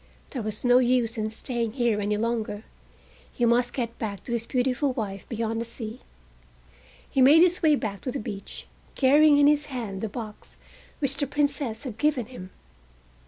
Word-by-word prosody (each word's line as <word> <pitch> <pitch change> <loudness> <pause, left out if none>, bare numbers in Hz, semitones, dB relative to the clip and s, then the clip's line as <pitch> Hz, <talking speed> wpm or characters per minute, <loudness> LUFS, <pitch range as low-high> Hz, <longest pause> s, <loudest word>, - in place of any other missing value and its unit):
There 255 - -4
was 215 -1 -4
no 245 0 +6
use 245 -2 +2
in 215 -1 -2
staying 230 0 -3
here 235 -5 +1
any 205 +1 0
longer. 220 -2 -2 0.7
He 240 - 0
must 240 +1 +3
get 235 -3 -4
back 205 -3 -4
to - - -7
his 230 -1 -2
beautiful 255 +2 0
wife 200 -5 -5
beyond 225 -1 -2
the - - -3
sea. 230 0 -7 1.1
He 270 - 0
made 290 +5 +8
his 360 0 +2
way 310 -3 +5
back 205 -7 -4
to 255 - -3
the 275 - -3
beach, 200 -4 -7 0.3
carrying 290 +2 +5
in 290 - +5
his 295 0 +3
hand 225 -8 -5
the 220 - -2
box 215 -1 -9 0.4
which 275 -1 0
the 285 - -1
Princess 280 -4 -1
had 235 -5 -7
given 290 -4 +1
him. 195 -6 -10
240 Hz, 180 wpm, -26 LUFS, 220-270 Hz, 1.1 s, made